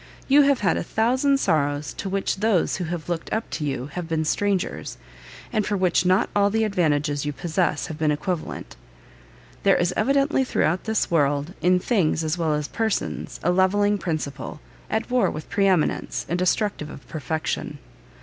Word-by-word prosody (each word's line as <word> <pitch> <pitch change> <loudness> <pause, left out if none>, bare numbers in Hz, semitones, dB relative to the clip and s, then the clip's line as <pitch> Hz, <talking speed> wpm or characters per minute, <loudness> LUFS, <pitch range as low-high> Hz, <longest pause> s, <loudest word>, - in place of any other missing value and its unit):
You 280 +2 +6
have 280 -4 +3
had 185 -5 +2
a - - -2
thousand 260 +8 +2
sorrows 145 - 0
to 195 - -5
which 195 0 -1
those 205 -3 +1
who 180 - -3
have 165 -2 -5
looked 170 -2 -3
up 220 +1 -1
to 155 - -3
you 135 -3 -2
have 175 -2 -4
been 160 -1 0
strangers, 200 +3 -1 0.6
and 215 -2 +2
for 205 0 -1
which 180 -1 +2
not 185 +1 +3
all 200 0 +4
the 225 +2 +1
advantages 150 -8 +1
you 145 - -1
possess 170 0 -1
have 160 -2 -7
been 155 -1 +2
equivalent. 160 +3 -3 0.9
There 195 - +4
is 175 +1 +1
evidently 275 0 +2
throughout 180 -8 0
this 220 -4 0
world, 145 0 +1
in 180 +1 +4
things 180 -6 +1
as 155 +1 0
well 160 -3 0
as 150 -1 -2
persons, 220 +2 -2
a 175 - +3
levelling 205 +3 +2
principle, 150 -5 -4 0.3
at 220 +3 -2
war 250 -1 +3
with 155 - -7
pre 200 -1 +3
eminence, 180 -5 0
and 175 +2 -1
destructive 185 -3 0
of 140 - -11
perfection." 155 0 -3
180 Hz, 180 wpm, -24 LUFS, 155-205 Hz, 0.9 s, You